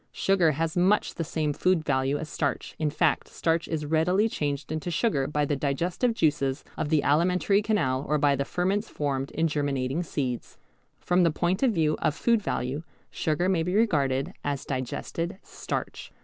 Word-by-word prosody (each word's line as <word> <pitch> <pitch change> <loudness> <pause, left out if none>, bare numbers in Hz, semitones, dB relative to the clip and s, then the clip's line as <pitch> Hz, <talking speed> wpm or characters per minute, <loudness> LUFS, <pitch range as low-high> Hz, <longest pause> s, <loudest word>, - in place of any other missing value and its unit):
Sugar 180 -5 +2
has 160 +2 -2
much 185 +4 +2
the 165 - -3
same 155 -2 -1
food 180 0 +1
value 135 +2 +1
as 155 - -5
starch, 145 -3 -2
in 155 -1 +1
fact 145 - +1
starch 165 0 -1
is 155 -2 -2
readily 170 +7 +2
changed 145 -7 -3
into 155 +2 -3
sugar 160 - +1
by 150 0 0
the 145 - 0
digestive 170 - 0
juices 145 -7 +1
of 145 - -2
the 155 -2 +3
alimentary 180 +7 +3
canal 140 -12 0
or 150 - +3
by 145 -1 +3
the 140 - -1
ferments 190 +8 -1
formed 140 -2 -2
in 165 +2 0
germinating 140 -1 -1
seeds. 130 -7 -4 0.4
From 180 +1 +2
the 170 - +5
point 175 +4 0
of 265 - +4
view 155 -6 +1
of 150 - +1
food 230 +3 +2
value 135 -5 -2 0.3
sugar 160 +3 0
may 185 -3 +2
be 180 +3 -1
regarded 150 - +1
as 140 -2 -2
digested 165 - -3
starch. - - -5
155 Hz, 175 wpm, -27 LUFS, 140-180 Hz, 0.4 s, the